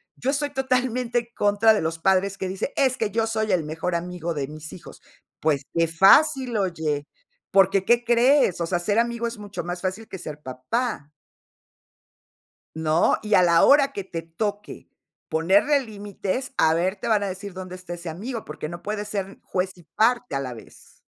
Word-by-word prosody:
Yo 255 - -3
estoy 290 0 -1
totalmente 255 -2 0
en 235 - -9
contra 205 +2 +4
de 210 - 0
los 165 +1 -2
padres 190 +2 +2
que 190 - -2
dicen: 190 +8 -3
"Es 260 -2 +2
que 220 -3 -1
yo 225 +1 0
soy 220 -1 -1
el 175 -4 +2
mejor 165 +3 -3
amigo 175 -1 -3
de 140 -3 -3
mis 155 +1 -9
hijos". 180 - -12 0.4
Pues, 145 -3 +1
qué 165 0 +3
fácil, 245 - +5
oye, 160 -7 -1 0.4
porque 195 0 +4
¿qué 240 0 +3
crees? 240 - +3
O - - +1
sea, 175 +1 -1
ser 205 +4 0
amigo 235 0 0
es 230 -1 -6
mucho 205 -4 -6
más 175 0 -5
fácil 190 +4 -4
que 190 - -7
ser 150 -3 -8
papá. 145 - -3 1.7
¿No? 160 +1 +2
Y 210 -1 +1
a 180 - +6
la 170 -1 +5
hora 280 -1 +5
que 200 - -4
te 170 -3 -6
toque 205 +5 -5 0.4
ponerle 195 - +3
límites, 205 +3 -5
a 160 0 +4
ver, 185 +4 0
te - - -6
van 215 -3 +3
a - - -1
decir: 190 +1 -6
"¿Dónde 185 0 -7
está 180 -1 -8
ese 170 -1 -7
amigo". 220 +8 -5
Porque 150 0 -6
no 175 0 -8
puede 210 +2 -3
ser 200 -2 -5
juez 185 0 -2
y 175 - -16
parte 240 - +2
a - - 0
la 130 -2 -4
vez. 115 - -16
195 Hz, 195 wpm, -24 LUFS, 170-230 Hz, 1.7 s, a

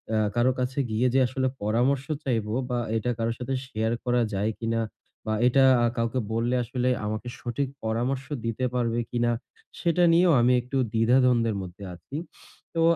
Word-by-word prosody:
আ - - +2 0.2
কারো 120 +2 +3
কাছে 130 +2 -1
গিয়ে 120 +4 +2
যে 135 - +4
আসলে 130 +1 -1 0.2
পরামর্শ 125 +6 +1 0.2
চাইবো 110 -5 -1 0.2
বা 125 - 0 0.2
এটা 115 +3 -2
কারো 115 0 0
সাথে 130 +2 -3
শেয়ার 110 -2 -1
করা 120 0 +2
যায় 105 +3 0
কিনা 115 0 0 0.4
বা 110 - -1
আ - - -3
এটা 135 +2 +4 0.3
কাউকে 115 +2 0
বললে 120 +2 +1
আসলে 125 +1 -1 0.2
আমাকে 110 +3 -3
সঠিক 130 +3 -2 0.2
পরামর্শ 125 +5 -1 0.2
দিতে 115 +3 -1
পারবে 120 -1 0
কিনা? 120 0 +1 0.5
সেটা 175 0 +2
নিয়েও 175 -1 +5
আমি 125 +1 +4
একটু 125 +3 -4 0.2
দ্বিধাদ্বন্দ্বের 115 -1 +3
মধ্যে 90 +2 -10
আছি। 135 - -11 0.6
তো 165 - +1
120 Hz, 165 wpm, -26 LUFS, 115-130 Hz, 0.6 s, নিয়েও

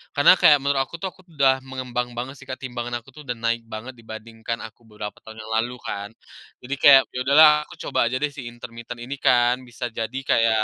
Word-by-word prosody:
karena 145 +4 +7
kayak 150 -1 +7
menurut 140 -1 +1
aku 135 - -10
tuh 190 - -1
aku 185 - -21
udah 135 -2 +4
mengembang 125 -2 -4
banget 125 +4 -5
sih 135 - -14
Kak, 130 - -6
timbangan 120 -1 -4
aku - - -17
tuh 150 - -13
udah 125 - -2
naik 115 0 -1
banget 110 +3 -7
dibandingkan 115 +1 -7
aku 115 +1 -12
beberapa 105 -1 -7
tahun 110 0 -10
yang 110 - -9
lalu 120 +2 -3
kan. 100 0 -5 0.5
Jadi 135 +3 -3
kayak, 135 -1 +9
ya 125 - -5
udahlah 150 +3 +8 0.2
aku - - -13
coba - - +1
aja 125 - -2
deh 150 0 -1
si 135 -4 -8
intermiten 120 0 -9
ini 135 +3 -5
kan 120 -1 +4
bisa 120 +1 -5
jadi 115 +3 -4
kayak, 110 -1 +3
120 Hz, 220 wpm, -23 LUFS, 115-130 Hz, 0.5 s, kayak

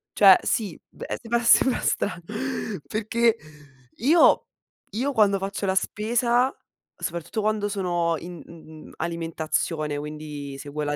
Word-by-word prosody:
Cioè 195 -3 +8
sì, 205 -7 -1
beh, - - -6
seba 235 0 0
sembra 255 +2 +5
stra 200 - -1 0.7
perchè 230 +1 +1 1.6
io 255 +7 0
quando 205 -4 +4
faccio 195 +1 -4
la 190 - +1
spesa, 235 +5 +1 0.4
soprattutto 170 +6 -4
quando 210 -1 0
sono 175 -4 0
in 175 0 -9
n 160 -2 -13
n - - -14
alimentazione, 160 -2 -2
quindi 150 -2 -7
seguo 145 +2 -5
la 145 0 -1
185 Hz, 120 wpm, -25 LUFS, 155-215 Hz, 1.6 s, Cioè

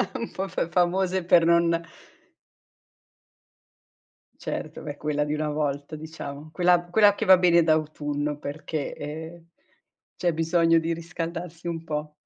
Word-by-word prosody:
un 235 -3 -4
po' 190 +1 -3
f 170 - -2
famose 180 +1 +1
per 170 -1 +5
non 170 0 +3 2.5
Certo, - - -5
beh, 145 -1 -6
quella 150 -1 -1
di 150 +1 -2
una 150 0 -1
volta 145 0 -2
diciamo, 155 -1 -8
quella 175 0 +3
quella 205 0 +5
che - - -3
va 190 -1 +7
bene 170 -1 +5
d'autunno 150 -2 -1
perché, 150 +1 -5
ehm 160 +3 -8 0.7
c'è 175 -1 +1
bisogno 165 0 +3
di 165 +1 -1
riscaldarsi 170 0 -5
un 165 -1 -4
po'. 150 -1 -4
165 Hz, 130 wpm, -25 LUFS, 150-175 Hz, 2.5 s, va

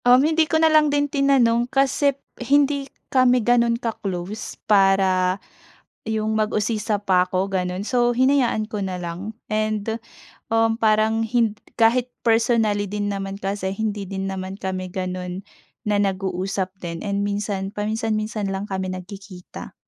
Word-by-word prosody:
Um, 250 +3 +6
hindi 315 0 +2
ko 320 - +3
nalang 310 -1 +5
din 290 0 +2
tinanong 265 -4 +2
kasi 275 +1 +2 0.2
hindi 280 +1 +2 0.2
kami 255 -1 +5
ganun 235 -1 +3
ka-close 205 -4 -5
para 195 -2 +3 0.7
yung 220 0 -1
mag-usisa 215 -1 0
pa 180 -1 +4
'ko 185 +1 0
ganun 180 0 -1
so 240 0 +2
hinayaan 255 -4 +2
ko 215 - -4
na 190 -2 -3
lang 175 +5 -5 0.2
and 215 -1 -1 0.7
uhm, 225 0 +3
parang 220 0 +3
hin 225 -2 +1 0.3
kahit 240 +2 +4 0.2
personally 225 -3 +2
din 205 0 -2
naman 195 0 -4
kasi 195 -1 -2
hindi 210 -1 -3
din 195 -1 -3
naman 190 0 -5
kami 185 -2 -4
ganun 185 0 -4 0.4
na 210 -1 +1
nag-uusap 190 -1 -2
din 170 -1 -5
and 200 0 -1
minsan 200 -1 -2
paminsan-minsan 215 0 -2
lang 195 +1 -3
kami 190 -2 -3
nagkikita. 185 0 -9
210 Hz, 135 wpm, -22 LUFS, 195-235 Hz, 0.7 s, Um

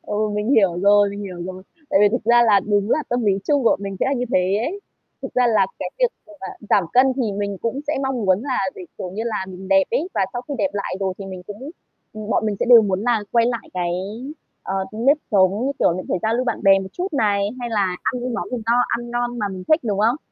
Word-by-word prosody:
Ừ, 210 +1 -1
mình 210 +3 -1
hiểu 195 -8 +3
rồi, 205 0 +5
mình 200 +1 -7
hiểu 190 -3 -6
rồi. 185 0 -7 0.3
Tại 195 - +4
vì 205 - +6
thực 235 +2 -2
ra 240 +1 +5
là 205 -2 +5
đúng 205 +1 0
là 305 - +2
tâm 245 -1 -1
lý 205 - +4
chung 290 -2 +2
bọn - - +3
mình 195 -1 -5
sẽ - - +2
là 270 - +1
như 250 -2 -1
thế 185 +2 +2
ấy. 395 +5 -7 0.4
Thực - - -7
ra 250 -1 +3
là 225 -2 +3
cái - - -4
việc - - +4 0.2
mà - - -18
bạn 190 - -7
giảm 200 - +4
cân 260 +1 +5
thì 235 -6 -1
mình 200 -1 -3
cũng 235 +6 -3
sẽ 300 - 0
mong 265 -4 -2
muốn 190 +3 +3
là 265 -2 -1 0.2
để, - - -9 0.2
kiểu 180 - -5
như 205 +4 -4
là, 215 -4 -2
mình 190 0 -9
đẹp 195 0 +5
ấy, 335 - 0
và - - +2
sau 245 - -4
khi 285 - -3
đẹp 195 -3 +1
lại 200 -2 -3
rồi 190 -1 -1
thì 195 - -7
mình 185 -1 -8
cũng 230 +8 -8 0.4
ừm, 215 -1 -8
bọn 220 - +1
mình 210 -2 -1
sẽ - - +1
đều 235 -2 +9
muốn 195 -2 -1
là 235 -1 +2
quay 235 -1 +4
lại 235 -2 -3
cái, 175 -1 -1 0.7
à, 190 - -4 0.2
nếp 245 +7 +3
sống, 200 +4 +3
như 280 - 0
kiểu - - +3
là, 185 +2 -4
phải - - 0
giao 220 +1 +1
lưu 250 - 0
bạn 245 - -2
bè 195 0 +6
một 190 0 -6
chút 365 +1 -4
này, 205 -7 +1
hay 240 -1 -4
là 195 -5 0
ăn 250 - -1
những 250 -1 -3
món - - -4
gì 250 - -2
no, 235 +1 +3
ăn 240 0 -3
ngon 240 0 -2
mà 210 -2 -1
mình 185 -1 -7
thích, 310 +1 +4
đúng 205 -4 -1
không? 225 +5 +3
215 Hz, 280 wpm, -21 LUFS, 195-245 Hz, 0.7 s, đều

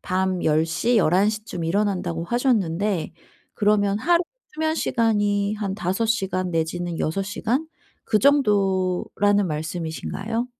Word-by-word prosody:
밤 185 0 -1
10 155 +1 +3
시, 225 +9 0
11 190 +1 +4
시쯤 215 -5 -4
일어난다."고 180 -2 -1
하셨는데 205 - 0 0.4
그러면 205 -1 +2
하루 340 +8 +3 0.3
수면 315 0 0
시간이 205 -7 +1
한 205 -3 -3
5 195 +3 -1
시간 190 -4 -1
내지는 165 +1 -2
6 165 +6 -1
시간 225 +9 -2 0.4
그 215 - +2
정도라는 205 -5 +2
말씀이신가요? 170 +8 -3
200 Hz, 240 characters per minute, -23 LUFS, 175-220 Hz, 0.4 s, 11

